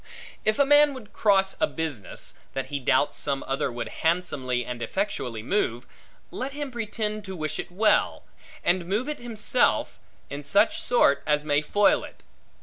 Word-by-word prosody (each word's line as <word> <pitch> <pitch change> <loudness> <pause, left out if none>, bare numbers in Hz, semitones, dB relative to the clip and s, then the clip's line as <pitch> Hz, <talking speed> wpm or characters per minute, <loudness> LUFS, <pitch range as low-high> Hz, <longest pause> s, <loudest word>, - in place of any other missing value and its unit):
If 215 0 +1
a 280 - +4
man 290 0 +5
would 220 -5 -11
cross 195 -2 +3
a - - +3
business, 145 - -4 0.2
that 135 0 -4
he 145 - -2
doubts 140 +2 +1
some 140 -1 0
other 135 0 -1
would 120 -1 -5
handsomely 135 -8 0
and 120 -1 -6
effectually 125 - -3
move, 120 - -1 0.5
let 270 +2 -4
him 290 -2 -5
pretend 215 -2 -3
to 190 -1 -6
wish 155 -2 -4
it 175 - -5
well, 210 +3 +2 0.4
and 175 0 +1
move 210 +8 -1
it 300 - -4
himself 240 +1 +1 0.3
in 145 +1 -7
such 200 +9 +3
sort 190 - +3
as 150 0 +1
may 145 -1 +2
foil 205 +6 +3
it. - - -12
180 Hz, 165 wpm, -26 LUFS, 140-215 Hz, 0.5 s, man